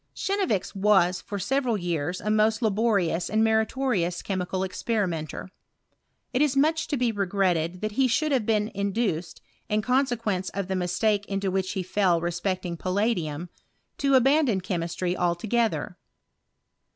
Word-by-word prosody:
Chenevix 385 Hz, -, -1 dB
was 190 Hz, -3 st, +3 dB
for 205 Hz, -, -5 dB
several 250 Hz, +2 st, 0 dB
years 175 Hz, -1 st, -2 dB
a 210 Hz, -, -2 dB
most 215 Hz, +2 st, +2 dB
laborious 200 Hz, -6 st, +1 dB
and 220 Hz, +1 st, +2 dB
meritorious 220 Hz, -5 st, +1 dB
chemical 185 Hz, -1 st, -2 dB
experimenter 185 Hz, -4 st, -3 dB, 0.8 s
It 255 Hz, -, +2 dB
is 285 Hz, -2 st, +2 dB
much 320 Hz, +3 st, +2 dB
to 290 Hz, -, -1 dB
be 245 Hz, -2 st, +1 dB
regretted 185 Hz, -4 st, 0 dB
that 215 Hz, 0 st, -2 dB
he 260 Hz, +5 st, +2 dB
should 300 Hz, +6 st, +1 dB
have 260 Hz, -5 st, +2 dB
been 215 Hz, -1 st, +1 dB
induced, 200 Hz, -5 st, -2 dB, 0.3 s
in 210 Hz, 0 st, +1 dB
consequence 235 Hz, -7 st, 0 dB
of 200 Hz, -2 st, -2 dB
the 190 Hz, -, 0 dB
mistake 200 Hz, +3 st, 0 dB
into 195 Hz, -1 st, -1 dB
which 190 Hz, 0 st, -1 dB
he 190 Hz, -2 st, -2 dB
fell 185 Hz, -2 st, +2 dB
re 170 Hz, +1 st, -2 dB
specting 175 Hz, -1 st, -3 dB
palladium, 180 Hz, -5 st, -1 dB, 0.5 s
to 275 Hz, -1 st, +3 dB
abandon 265 Hz, -4 st, +4 dB
chemistry 175 Hz, -1 st, -2 dB
altoge 190 Hz, +7 st, +1 dB
ther. -, -, -6 dB
200 Hz, 145 wpm, -26 LUFS, 180-230 Hz, 0.8 s, abandon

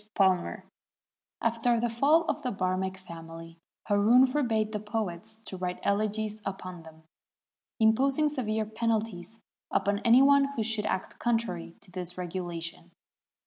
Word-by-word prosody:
PALMER 190 Hz, -3 st, +2 dB, 0.8 s
After 230 Hz, +1 st, +2 dB
the 240 Hz, -, +1 dB
fall 280 Hz, +8 st, +3 dB
of 315 Hz, -, -2 dB
the 255 Hz, -, -2 dB
Bannek 190 Hz, 0 st, -1 dB
family, 165 Hz, -2 st, -10 dB, 0.3 s
Haroun 220 Hz, +5 st, +5 dB
forbade 235 Hz, -6 st, 0 dB
the 210 Hz, -, -2 dB
poets 215 Hz, -1 st, -4 dB
to 190 Hz, -, -4 dB
write 180 Hz, 0 st, -3 dB
elegies 215 Hz, +1 st, -1 dB
upon 185 Hz, -3 st, -6 dB
them, 160 Hz, 0 st, -15 dB, 0.8 s
imposing 265 Hz, +7 st, +3 dB
severe 220 Hz, -7 st, -1 dB
penalties 220 Hz, -2 st, -2 dB, 0.3 s
upon 200 Hz, 0 st, +1 dB
any 235 Hz, +4 st, +6 dB
one 280 Hz, 0 st, +6 dB
who 225 Hz, -, 0 dB
should 215 Hz, -1 st, 0 dB
act 185 Hz, -, -3 dB
contrary 225 Hz, -8 st, -1 dB
to 190 Hz, -, -16 dB
this 180 Hz, -1 st, -5 dB
regulation. 175 Hz, -1 st, -5 dB
215 Hz, 135 wpm, -29 LUFS, 180-230 Hz, 0.8 s, any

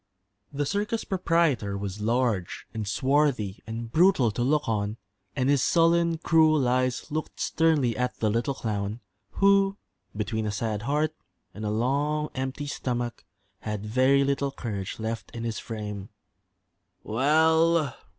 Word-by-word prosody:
The 145 Hz, 0 st, -1 dB
circus 210 Hz, +7 st, -1 dB
proprietor 165 Hz, -, +1 dB
was 100 Hz, +1 st, -5 dB
large 115 Hz, -5 st, 0 dB
and 110 Hz, -2 st, -4 dB
swarthy 125 Hz, -1 st, +1 dB
and 115 Hz, +1 st, -5 dB
brutal 160 Hz, -, +4 dB
to 120 Hz, -, -4 dB
look 150 Hz, +4 st, +1 dB
on, 105 Hz, -1 st, -1 dB, 0.4 s
and 130 Hz, -2 st, 0 dB
his 140 Hz, -1 st, +3 dB
sullen, 170 Hz, +1 st, +3 dB
cruel 155 Hz, -4 st, +3 dB
eyes 130 Hz, +3 st, 0 dB
looked 155 Hz, +1 st, -4 dB
sternly 150 Hz, -8 st, +2 dB
at 125 Hz, +2 st, -2 dB
the 110 Hz, -2 st, +1 dB
little 120 Hz, +5 st, 0 dB
clown, 105 Hz, -1 st, -3 dB, 0.3 s
who, 195 Hz, 0 st, +3 dB, 0.4 s
between 110 Hz, 0 st, -2 dB
a -, -, -1 dB
sad 105 Hz, 0 st, -2 dB
heart 150 Hz, +5 st, 0 dB, 0.4 s
and 105 Hz, -, -8 dB
a 105 Hz, -, -1 dB
long 145 Hz, +7 st, 0 dB
empty 135 Hz, +2 st, -3 dB
stomach, 120 Hz, -4 st, -3 dB, 0.4 s
had 105 Hz, -1 st, -4 dB
very 130 Hz, +5 st, +3 dB
little 140 Hz, 0 st, 0 dB
courage 105 Hz, -8 st, -5 dB
left 110 Hz, +1 st, -4 dB
in 115 Hz, -, -5 dB
his 115 Hz, -1 st, -3 dB
frame. 105 Hz, -3 st, -6 dB, 0.9 s
"Well!" 160 Hz, +4 st, +3 dB
130 Hz, 140 wpm, -27 LUFS, 110-150 Hz, 0.9 s, brutal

